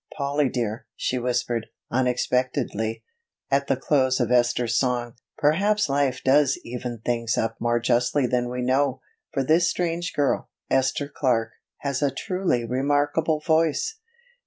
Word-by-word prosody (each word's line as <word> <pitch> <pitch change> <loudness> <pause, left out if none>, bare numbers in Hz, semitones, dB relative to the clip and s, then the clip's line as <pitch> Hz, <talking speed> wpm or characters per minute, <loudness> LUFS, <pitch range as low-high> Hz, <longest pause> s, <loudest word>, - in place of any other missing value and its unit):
"Polly 140 -1 +1
dear," 115 -3 -3
she 125 - -1
whispered 120 -2 -1 0.2
unexpectedly 125 -2 0 0.5
at 140 0 +2
the 135 - +2
close 130 -1 +2
of 120 -1 0
Esther's 120 -1 +2
song, 120 -2 0 0.2
"perhaps 200 +6 +2
life 135 -2 0
does 140 0 +4
even 120 -1 -6
things 115 -2 0
up 115 0 -1
more 120 0 +1
justly 120 +3 +2
than 120 0 0
we 125 0 -3
know, 130 +1 +1 0.3
for 135 - 0
this 165 +5 +3
strange 175 -1 -2
girl, 145 -2 0 0.2
Esther 135 +2 +1
Clark, 120 -6 0 0.3
has 140 -1 -2
a 145 - +3
truly 180 -7 -1
remarkable 145 +5 +1
voice." 160 - +1
130 Hz, 135 wpm, -24 LUFS, 120-145 Hz, 0.5 s, does